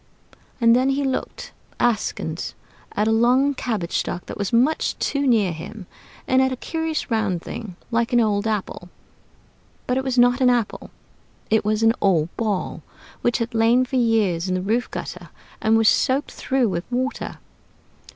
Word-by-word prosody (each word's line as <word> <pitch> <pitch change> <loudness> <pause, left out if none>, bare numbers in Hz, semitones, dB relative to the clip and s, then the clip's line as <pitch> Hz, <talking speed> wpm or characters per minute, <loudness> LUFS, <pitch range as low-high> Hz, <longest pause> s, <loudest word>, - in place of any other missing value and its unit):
And 230 -1 +5
then 255 +2 +2
he 275 +1 0
looked 265 -1 -3 0.3
askance 240 -3 -1 0.4
at 210 - +1
a - - +3
long 250 +5 +3
cabbage 220 -10 -2
stalk 175 - -4
that - - -7
was 200 -1 -2
much 255 +7 +2
too 280 -1 0
near 215 -7 +3
him, 185 +5 -8 0.4
and 260 0 +4
at 265 0 +2
a - - -1
curious 320 +1 -3
round 205 -6 0
thing 205 -6 -7 0.2
like 235 +2 +1
an 240 - +4
old 210 -2 +1
apple; 200 -4 -3 1.0
but 250 - 0
it - - -3
was 260 -1 -2
not 245 +1 +4
an 255 - +5
apple 240 -4 -1 0.6
it 220 - +3
was 215 +1 0
an 225 0 +5
old 170 -4 +2
Ball, 210 -5 -2 0.4
which 240 - +1
had 230 -1 -3
lain 230 +3 +4
for 260 +1 -2
years 210 -8 +2
in 185 - 0
the 185 - -1
roof 230 +5 0
gutter - - -7 0.3
and 220 +1 +3
was 225 -1 +3
soaked 265 +6 +2
through 265 -2 0
with 175 -4 -2
water. 255 +2 -2
230 Hz, 170 wpm, -22 LUFS, 210-255 Hz, 1.0 s, And